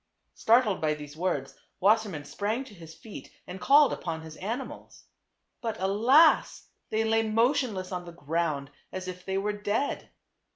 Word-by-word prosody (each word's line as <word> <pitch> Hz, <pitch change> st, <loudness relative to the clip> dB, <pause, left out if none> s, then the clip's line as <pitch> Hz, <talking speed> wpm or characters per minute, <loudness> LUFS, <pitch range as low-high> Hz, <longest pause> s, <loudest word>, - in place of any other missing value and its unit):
Startled 225 Hz, -3 st, +3 dB
by 155 Hz, -1 st, +1 dB
these 145 Hz, -1 st, -10 dB
words, 155 Hz, -6 st, -2 dB, 0.3 s
Wassermann 200 Hz, -6 st, +2 dB
sprang 215 Hz, -, -2 dB
to 260 Hz, -, -14 dB
his 165 Hz, -4 st, -12 dB
feet 220 Hz, -, -11 dB, 0.2 s
and 180 Hz, +1 st, -8 dB
called 285 Hz, +1 st, +6 dB
upon 165 Hz, -2 st, -4 dB
his 160 Hz, -1 st, -10 dB
animals. 230 Hz, +7 st, -6 dB, 0.6 s
But 225 Hz, -2 st, -3 dB
alas! 235 Hz, -, +4 dB, 0.2 s
they 220 Hz, +1 st, +1 dB
lay 225 Hz, 0 st, +2 dB
motionless 225 Hz, -4 st, +1 dB
on 180 Hz, -1 st, -4 dB
the 170 Hz, -, -9 dB
ground 155 Hz, -3 st, -2 dB, 0.2 s
as 185 Hz, 0 st, -6 dB
if 180 Hz, 0 st, -7 dB
they 190 Hz, 0 st, -2 dB
were 205 Hz, +2 st, -1 dB
dead. 205 Hz, +7 st, -2 dB
195 Hz, 155 wpm, -28 LUFS, 170-225 Hz, 0.6 s, called